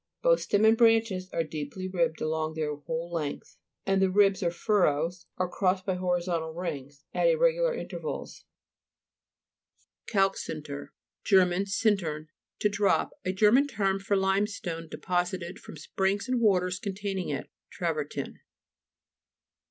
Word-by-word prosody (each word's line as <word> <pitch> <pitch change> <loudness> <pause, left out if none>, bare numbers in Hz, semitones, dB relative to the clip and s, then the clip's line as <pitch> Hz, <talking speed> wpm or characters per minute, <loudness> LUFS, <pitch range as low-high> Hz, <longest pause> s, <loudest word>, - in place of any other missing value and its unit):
Both - - +4
stem 205 +2 +2
and 220 +1 +6
branches 225 -5 +3
were 165 - 0
deeply 155 +4 -5
ribbed 170 -4 0
along 155 0 -1
their 155 -2 -1
whole 160 +4 -5
length, 155 -4 -4 0.3
and 195 0 +2
the 190 - +4
ribs 195 0 +4
or 175 - +2
furrows 175 -2 0
were 185 - 0
crossed 185 +1 0
by 190 - 0
horizontal 175 -3 -1
rings 145 -5 -5
at - - +2
irregular - - +3
inter - - -6
vals - - -5 1.7
(p. - - -9
42). - - -1
CALC 195 0 +3
SINTER 145 -2 -6 0.3
Ger. 190 -3 +6 0.2
sinlern, 195 -8 0 0.3
to - - +2
drop. 200 0 +1
A 185 - 0
German 215 +9 +4
term 195 -6 0
for 200 +1 0
limestone 190 -3 -1
de - - -7
posited 180 0 -2
from - - -11
springs 195 - -1
and 255 -2 0
waters 185 -4 +2
containing 195 -2 -3
it. 140 -3 -4 0.2
Travertin. - - -3
185 Hz, 145 wpm, -28 LUFS, 165-205 Hz, 1.7 s, and